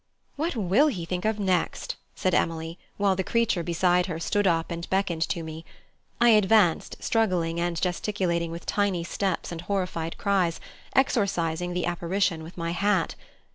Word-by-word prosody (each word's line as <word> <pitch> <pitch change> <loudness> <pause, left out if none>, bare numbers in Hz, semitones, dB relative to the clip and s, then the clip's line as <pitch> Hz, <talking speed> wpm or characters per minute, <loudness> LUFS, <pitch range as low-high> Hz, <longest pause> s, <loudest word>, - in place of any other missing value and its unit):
"What 315 +1 -2
will 215 - +3
he 185 - -2
think 180 +2 -3
of 215 -1 0
next!" 185 -4 0 0.2
said 185 - 0
Emily, 165 +1 -1 0.2
while 200 -1 +2
the 190 - -1
creature 230 -4 +1
beside 175 +2 +2
her 165 -3 -4
stood 205 +4 +1
up 165 -1 +1
and 170 0 -5
beckoned 190 -4 0
to 170 - -2
me. 160 0 -7 0.6
I 240 0 +6
advanced 210 -5 +4
struggling 180 -7 +1
and 170 -1 -1
gesticulating 180 -2 -1
with 170 +2 -7
tiny 200 -4 0
steps 190 +2 -2
and 165 -1 -5
horrified 175 -3 -2
cries, 190 -5 +1 0.4
exorcising 180 - +1
the 180 - 0
apparition 175 0 0
with 165 +3 -11
my 170 -1 -2
hat. 190 -1 +1
180 Hz, 160 wpm, -26 LUFS, 170-200 Hz, 0.6 s, I